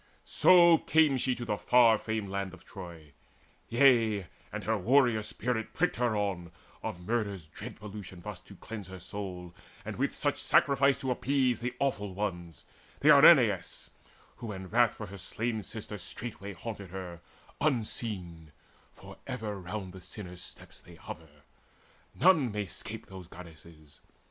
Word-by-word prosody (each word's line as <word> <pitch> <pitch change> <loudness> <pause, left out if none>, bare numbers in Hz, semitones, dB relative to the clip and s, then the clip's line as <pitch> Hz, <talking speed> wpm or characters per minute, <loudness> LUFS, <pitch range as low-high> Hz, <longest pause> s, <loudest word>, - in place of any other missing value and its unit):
So 170 -2 +6
came 155 -4 +3
she 130 0 0
to 120 - -6
the 105 -2 -1
far 115 -3 +5
famed 110 -3 -3
land 100 -1 -3
of 90 - -20
Troy. 85 -6 -10 0.6
Yea, 115 -6 +4 0.3
and - - -5
her 110 - +1
warrior 120 +2 +3
spirit 110 +1 -3
pricked 180 +3 +1
her 120 -3 +1
on, 95 -4 -2 0.3
Of 90 0 -6
murder's 100 -6 -2
dread 75 - -9
pollution 100 -3 -9
thus - - -7
to - - -15
cleanse 105 -3 -8
Her 95 0 -9
soul, 90 -2 -6 0.3
and - - -5
with - - -1
such - - 0
sacrifice 140 0 +4
to 130 - -1
appease 130 -2 +1
The 120 +1 -4
Awful 105 -9 -1
Ones, 85 -6 -4 0.4
the - - +5
Erinnyes, - - +6 0.5
who 115 -3 -6
in 95 -2 -7
wrath 120 +1 +3
For 110 - -6
her 100 0 -10
slain 110 +4 -2
sister 105 +1 -7
straightway 100 +1 -5
haunted 100 0 -7
her 90 -2 -7 0.4
Unseen: 105 - -2 0.4
for - - -13
ever 110 -5 -4
round 95 0 -6
the 95 - -10
sinner's 90 -1 -8
steps - - -8
They - - -15
hover; 75 -2 -11 0.7
none 160 - +4
may 105 0 -2
'scape 110 +4 -7
those 95 -3 -10
Goddesses. 80 -3 -14
105 Hz, 155 wpm, -30 LUFS, 90-120 Hz, 0.7 s, So